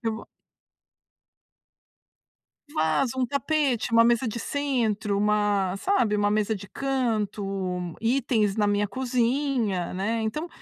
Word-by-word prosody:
E 225 - +1
vou 220 - -7 2.4
Vaso, 245 - 0
um 255 - +1
tapete, 280 -3 0
uma 230 0 +6
mesa 240 +1 +3
de 230 +1 -3
centro, 230 -8 -1
uma 205 -2 +1
sabe, 245 - +1
uma 205 0 +2
mesa 215 +1 +1
de 200 -1 -9
canto, 230 -7 -1 0.6
itens 225 -4 +1
na 210 -1 +2
minha 205 0 +1
cozinha, 245 -4 0
né. 220 +5 -1
Então, 300 +11 -3
225 Hz, 120 wpm, -26 LUFS, 205-260 Hz, 2.4 s, uma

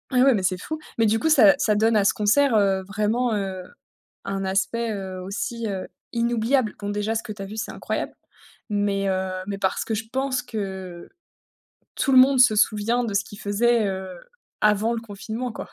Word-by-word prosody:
Et 250 - +5
ouais, 270 - +6
mais 205 - 0
c'est 185 0 +1
fou. 315 +10 -5 0.2
Mais 225 - +3
du 220 +1 +2
coup, 320 - +1
ça 225 -10 +7
ça 215 - +2
donne 220 +2 +3
à 210 - +4
ce 200 - +3
concert, 225 +4 +3
heu, 195 -2 +2
vraiment, 215 +4 0
heu, 190 -2 -3 0.6
un 195 0 -3
aspect, 205 +4 -1
heu, 190 -3 -5
aussi, 215 +4 -4
heu, 190 -2 -4 0.3
inoubliable. 235 0 +1
Bon, 205 - -4
déjà, 210 +2 -1
ce 225 - 0
que 220 - -7
tu 205 - -8
as - - -4
vu, 210 +3 -9
c'est 220 - -3
incroyable, - - -4 0.6
mais, 205 -1 0
heu, 190 0 -1 0.2
mais 200 -1 -3
parce 190 -1 -1
que 225 - -2
je 220 +1 -4
pense 265 -1 -1
que 190 -7 -6 0.9
tout 270 - +1
le 260 - +7
monde 265 +1 +6
se 245 -3 +6
souvient 220 +4 +2
de 210 - -3
ce 200 +1 +1
qu'il 205 - -12
faisait, 225 +2 +2
heu, 190 -1 -4 0.5
avant 210 +2 +3
le 230 - -3
confinement 225 +3 -6
quoi. - - -8
210 Hz, 205 wpm, -24 LUFS, 195-235 Hz, 0.9 s, ça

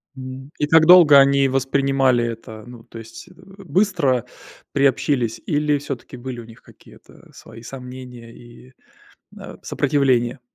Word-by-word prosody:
М, 130 +1 -10
и 150 - 0
как 160 +1 +5
долго 165 -5 +8
они 140 0 +3
воспринимали 135 -1 +1
это? 110 -1 -8
Ну, 120 -1 -13
то 115 - -14
есть, 115 +7 -12
э, 185 - -18
быстро 180 - -2 0.5
приобщились 135 -4 0
или 150 0 0
всё-таки 140 -2 -8
были 125 0 -8
у 115 - -10
них 115 0 -17
какие-то - - -20
свои 115 - -14
сомнения 125 -1 -11
и, 120 +2 -17 0.7
э, - - -11
сопротивления? 130 -3 0
130 Hz, 135 wpm, -20 LUFS, 120-145 Hz, 0.7 s, долго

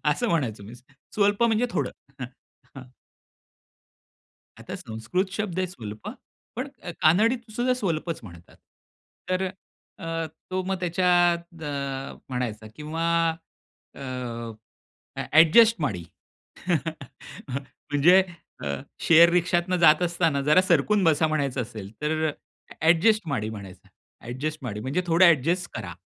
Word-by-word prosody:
असं 240 +10 0
म्हणायचो 130 - -1
मी. 110 - -10 0.4
स्वल्प 205 +1 +2
म्हणजे 230 +1 +2
थोडं - - -1 0.3
हं, 125 - -3 0.5
हं. 135 - -7 1.8
आता - - -7
संस्कृत 180 - -3
शब्द 200 -3 -3
आहे 185 - 0
स्वल्प, 110 - -9 0.5
पण 255 +4 -3 0.2
अ, 175 - -5
कानडीतसुद्धा 230 +7 +2
स्वल्पच 170 -8 -2
म्हणतात. 85 -4 -14 0.7
तर 185 +1 +1 0.5
अ, - - -10 0.5
तो 185 0 -1
मग 190 +1 -1
त्याच्यात 175 -2 +1
अ, 140 -2 -4 0.2
म्हणायचा 115 -4 -4
किंवा 155 +3 -4 0.9
अ, - - -9 1.4
एडजस्ट 225 +8 +7
माडी 100 -12 -2 1.9
म्हणजे 170 +7 +6 0.4
अ, - - -3 0.3
शेअर 170 +1 +7
रिक्षातून 175 +1 +1
जात 160 -1 +6
असताना 165 -4 +1
जरा 150 +6 +5
सरकून 185 +3 +2
बसा 160 -1 +3
म्हणायचं 140 -4 -1
असेल 110 -4 -8
तर 155 0 0 0.5
एडजस्ट 175 +5 +4
माडी 115 -8 -2
म्हणायचं. 100 -4 -10 0.4
एडजस्ट 150 +6 -4
माडी 105 -4 -4
म्हणजे 135 +10 -1
थोडं 170 +2 +5
एडजस्ट 170 +3 +3
करा. 100 -6 -5
165 Hz, 115 wpm, -25 LUFS, 135-185 Hz, 1.9 s, एडजस्ट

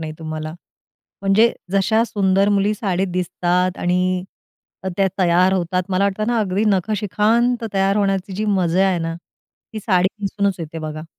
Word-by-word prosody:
नाही 155 -1 -5
तुम्हाला. 155 -1 -5 0.7
म्हणजे 210 +4 +4 0.2
जशा 220 +3 +3
सुंदर 195 -2 +1
मुली 205 +1 +2
साडीत 195 -3 -1
दिसतात 180 0 0
आणि 180 +1 0 0.6
त - - -1
त्या 195 - +3
तयार 180 0 +3
होतात. 180 0 0
मला 190 +1 +1
वाटतं 200 +2 -1
ना 240 0 +1
अगदी 200 0 0
नखशिखांत 215 +4 +1
तयार 195 0 +2
होण्याची 195 -1 0
जी 210 +3 -2
मजा 190 -2 +2
आहे 180 -2 0
ना, 165 0 -3 0.6
ती 220 - -4
साडी 185 -3 +2
नेसूनच 200 0 0
येते 165 -1 -6
बघा. 155 0 -6
190 Hz, 155 wpm, -20 LUFS, 180-205 Hz, 0.7 s, म्हणजे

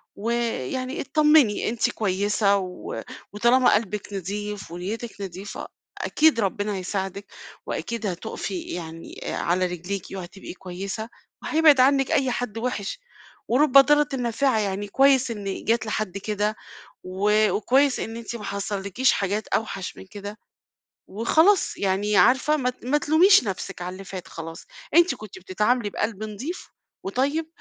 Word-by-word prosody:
ويعني 235 - -2
اتطمني، 300 -7 +4
أنتِ 235 0 +1
كويسة 200 0 +1
و 185 -2 -5 0.3
وطالما 240 +4 +4
قلبِك 210 -1 -3
نضيف 205 0 -5
ونيتِك 205 +5 -5
نضيفة، 195 +1 -6 0.3
أكيد 310 -6 +3
ربنا 205 0 -1
هيساعدِك، 195 +1 -4 0.3
وأكيد 235 -1 -4
هتوقفي 190 0 -4
يعني 165 -1 -7
آآ، - - -3
على 185 +2 +1
رجليكِ 180 +2 -4
وهتبقى 190 0 -8
كويسة 195 +4 -6 0.3
وهيبعد 310 -4 +5
عنِّك 270 +1 +4
أي 265 -2 +2
حد 235 -3 -3
وحش، 235 - -3 0.5
ورُب 260 +3 +3
ضارةٍ 295 +1 +6
نافعة، 245 0 +1
يعني 200 0 -2
كويس 265 +2 +4
إن 200 -3 -5
جات 230 0 +1
لحد 215 -3 -2
كده، 210 +1 -1 0.5
و 210 +3 +2
وكويس 265 +6 +2
إن 225 +1 -5
أنتِ 235 0 -6
ما 210 - -9
حصلكيش 200 +4 0
حاجات 205 +2 -1
أوحش 195 -4 -2
من 190 - -11
كده، 205 +2 -8 0.7
وخلاص، 320 - +3
يعني 200 +1 +1
عارفة 265 +7 +4
ما 250 -2 0
ت 250 - -10
ما 290 +4 +3
تلوميش 330 +5 +5
نفسِك 195 -2 -5
على 180 +1 -4
اللي 195 +1 -9
فات 185 -1 -8
خلاص، 165 0 -8 0.3
أنتِ 345 +2 +5
كنتِ 210 -3 -10
بتتعاملي 210 +5 0
بقلب 215 0 -3
نضيف 245 - -6 0.3
وطيب، 280 +10 -1
210 Hz, 135 wpm, -24 LUFS, 195-255 Hz, 0.7 s, ضارةٍ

